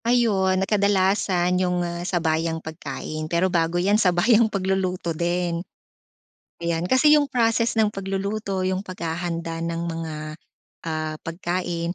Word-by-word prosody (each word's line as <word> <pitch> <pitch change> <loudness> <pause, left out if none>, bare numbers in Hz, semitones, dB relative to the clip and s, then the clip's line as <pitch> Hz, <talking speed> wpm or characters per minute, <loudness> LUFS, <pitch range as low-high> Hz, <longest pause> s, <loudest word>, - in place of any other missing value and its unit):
Ayun, 210 -6 +3
na 190 - +1
kadalasan 190 -3 +2
'yung, 180 -1 0
ah, 170 0 -4
sabayang 165 -2 0
pagkain 155 -1 -6
pero 175 +2 +1
bago 165 0 +1
yan 200 +5 +3
sabayang 215 +5 +4
pagluluto 185 -3 -1
din. 170 +1 -1 1.0
Ayan 170 -1 -1
kasi 300 +4 +6
'yung 290 -2 +3
process 230 -1 +1
ng 215 -1 +2
pagluluto, 195 0 -2
'yung 185 0 -1
paghahanda 170 -2 -4
ng 165 0 -2
mga, 165 -1 -4 0.7
ah, 155 -1 -3
pagkain, 175 0 -3
180 Hz, 125 wpm, -24 LUFS, 170-195 Hz, 1.0 s, kasi